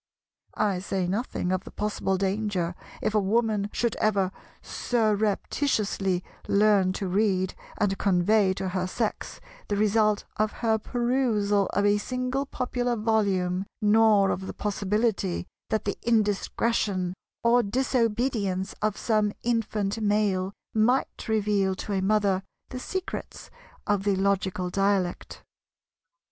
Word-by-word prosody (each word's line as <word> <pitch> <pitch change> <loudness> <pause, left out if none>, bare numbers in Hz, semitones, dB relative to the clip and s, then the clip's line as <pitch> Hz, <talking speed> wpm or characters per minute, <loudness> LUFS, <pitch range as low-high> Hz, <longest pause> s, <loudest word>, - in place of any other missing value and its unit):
I 200 -3 +1
say 190 -1 -2
nothing 190 -1 -2
of 185 0 0
the - - -10
possible 205 -2 -1
danger 190 -2 -1 0.3
if 215 - 0
a 215 - +4
Woman 210 0 +1
should 235 -2 0
ever 195 -3 +1 0.3
surreptitiously 210 -3 0 0.2
learn 200 -2 +4
to 195 0 -3
read 190 -1 +1 0.2
and 200 -2 +1
convey 195 +1 +3
to 190 -1 -3
her 185 0 -1
Sex 215 +3 -3 0.3
the 205 - -1
result 210 0 +2
of 215 0 +1
her 220 -1 +3
perusal 230 -5 +1
of 200 +1 +2
a 205 0 +3
single 255 +4 -2
popular 245 -2 -1
volume; 200 -4 +1
nor 210 -2 +4
of 190 +1 -3
the - - -6
possibility 205 -2 -1 0.2
that 220 - -1
the 200 - -1
indiscretion 210 -3 +1 0.3
or 235 +1 +5
disobedience 225 -4 0
of 215 -1 0
some 215 -2 +1
infant 220 -3 -1
Male 205 -3 +1 0.2
might 240 +5 +1
reveal 205 -3 +1
to 205 - -5
a 190 - 0
Mother 200 -1 +2 0.3
the 255 - -6
secrets 375 +7 -5 0.3
of 205 -2 +1
the 200 -1 +2
logical 190 -2 0
dialect. 195 -2 -1
205 Hz, 125 wpm, -26 LUFS, 195-220 Hz, 0.3 s, or